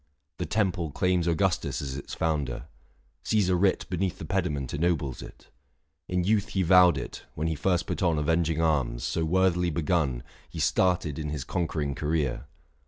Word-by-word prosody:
The 90 - -2
temple 90 -3 0
claims 90 +3 +1
Augustus 85 +1 0
as 65 -2 -4
its 70 - -7
founder; 75 -6 -1 0.6
Caesar 95 -4 +2
writ 95 +1 +2
Beneath 90 0 -2
the - - -7
pediment 80 -8 -2
ennobles 75 -4 -1
it. - - -13 0.6
In 90 -1 0
youth 105 +1 +2
he 95 - +1
vowed 90 0 +6
it, - - -7
when 80 - -2
he 80 - 0
first 85 +2 0
put - - -4
on 85 -3 +3
645 - - -2
Avenging 80 -1 +1
arms: 70 -7 0
so 80 - -1
worthily 90 0 +2
begun, 75 -6 0 0.3
He - - -10
started 85 -5 +1
in 75 -1 -3
his 75 -3 -3
conquering 75 -4 -2
career. 75 -2 -1
85 Hz, 170 wpm, -27 LUFS, 75-90 Hz, 0.6 s, vowed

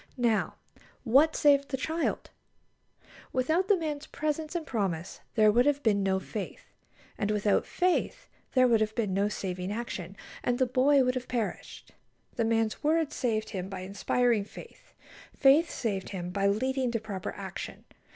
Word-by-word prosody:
Now, 235 -3 +1 0.5
what 280 +7 +4
saved 280 -1 +4
the 265 - -2
child? 320 +5 -2 1.0
Without 315 +9 +1
the 405 - +4
man's 305 -3 -4
presence 310 +2 -3
and 335 -2 -2
promise 190 - -3 0.2
there 215 -2 +6
would 245 +5 +3
have 290 0 +1
been 205 -3 +3
no 190 -1 +1
faith; 200 +1 -7 0.5
and 205 - 0
without 210 -1 +1
faith 365 0 0 0.3
there 255 -1 +6
would 230 -2 +3
have 215 0 0
been 210 -5 0
no 200 +2 +1
saving 185 -2 -4
action, 200 -4 -5 0.3
and 245 0 +1
the 260 - +3
boy 265 +2 +4
would 250 0 +1
have 255 -1 -4
perished. 235 -4 -4 0.4
The 230 - +1
man's 225 -1 0
word 315 0 +2
saved 220 -3 -1
him 190 -2 -4
by 190 -2 -6
inspiring 210 +4 +1
faith. 200 - -14 0.4
Faith 290 +5 +5
saved 200 -5 -3
him 180 -3 -5
by 195 +1 +1
leading 260 +5 0
to 230 - 0
proper 205 -4 -5
action. 195 -1 -7
230 Hz, 160 wpm, -29 LUFS, 200-275 Hz, 1.0 s, there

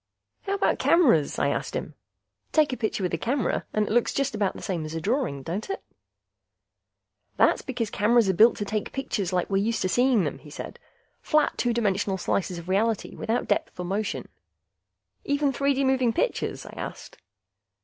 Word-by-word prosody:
"How 395 - +1
about 400 - +1
cameras?" 250 - +4
I - - +2
asked - - -3
him. - - -4 0.6
"Take 305 -4 +3
a - - -3
picture 220 -3 -2
with 180 - -1
a 165 - 0
camera 250 - -1
and 215 0 +1
it - - -4
looks 240 +1 +2
just 275 -2 0
about 205 -3 0
the - - -8
same 175 -5 -2
as 155 +1 -6
a - - -1
drawing, 205 - -1
don't 185 - -4
it?" 390 - -4 1.5
"That's - - +4
because 235 -5 -3
cameras 225 +1 +3
are 190 - +3
built 225 +6 +6
to 205 - -3
take 215 +1 -3
pictures 205 -9 -2
like 180 -1 0
we're 195 - 0
used 230 +1 0
to 185 - 0
seeing 245 -2 +3
them," 145 - -3
he 150 - -14
said. 145 - -8 0.4
"Flat, 305 -1 +2
two 245 - 0
dimensional 205 -4 0
slices 185 0 -1
of 170 0 -9
reality, 210 +3 0
without 230 +2 -1
depth 320 - -1
or 180 - -3
motion." 200 +3 -2 1.0
"Even 285 -1 +1
3 280 +2 +1
D 275 - +1
moving 260 -3 +2
pictures?" - - -1
I - - -10
asked. - - -8
220 Hz, 190 wpm, -26 LUFS, 190-265 Hz, 1.5 s, built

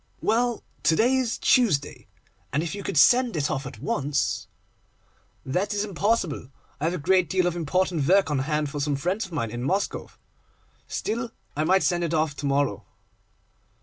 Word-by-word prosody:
'Well, 235 +1 +1 0.2
to 155 +1 +3
day 240 +9 +3
is 255 -3 0
Tuesday, 205 - +2 0.4
and 145 +4 0
if 170 - -4
you 200 - -5
could 175 - -3
send 245 - +5
it 145 -1 0
off 135 -1 -3
at 130 - -9
once—' 140 +3 -1 1.0
'That 190 +10 -1
is 205 +1 0
impossible; 195 - -1 0.3
I 150 - -2
have 170 +2 0
a - - -2
great 180 +2 +2
deal 185 0 +2
of 175 -1 0
important 170 -2 0
work 195 -3 +4
on 145 - +1
hand 150 +1 -1
for 145 - -4
some 145 0 0
friends 185 +9 -1
of - - -19
mine 115 -9 -2
in 120 +1 -5
Moscow. 145 +11 -1 0.8
Still, 235 +3 -3 0.3
I 155 +2 0
might 190 +3 +3
send 175 -1 +1
it 165 -1 -1
off 155 -2 0
to 145 - -3
morrow. 140 -6 0
170 Hz, 180 wpm, -25 LUFS, 145-200 Hz, 1.0 s, send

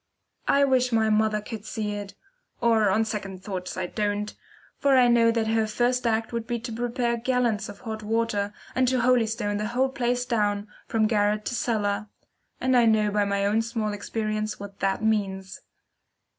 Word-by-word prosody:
I 280 - +4
wish 255 -2 +3
my 220 -1 +2
mother 215 0 +2
could 215 0 -7
see 215 -1 -3
it 205 -1 -6 0.4
or, 225 -3 +3
on 215 +4 +2
second 195 -3 -5
thoughts, 185 -3 -5
I 185 - -1
don't; 205 +2 -2 0.5
for 275 -2 +4
I 250 -1 +6
know 235 -1 +5
that 230 -1 +1
her 220 0 +1
first 245 +3 +1
act 225 +1 0
would 230 -1 -3
be 240 - -1
to 240 +1 -6
prepare 240 +1 -1
gallons 235 -4 0
of 200 -1 -10
hot 220 -2 -5
water, 210 -2 0 0.2
and 255 0 +2
to 255 0 +2
holystone 225 -4 +1
the 210 +1 -2
whole 260 +3 +1
place 245 -1 -1
down, 205 -3 0 0.2
from 220 -1 +2
garret 210 -1 +1
to - - -2
cellar 210 -3 -1 0.5
and 260 0 +2
I 240 -2 +5
know 215 -1 +3
by 205 0 +2
my 200 0 0
own 210 +3 +2
small 225 -2 -2
experience 215 0 -3
what 200 0 -9
that 195 +2 0
means. 195 -3 -1
220 Hz, 185 wpm, -26 LUFS, 205-235 Hz, 0.5 s, I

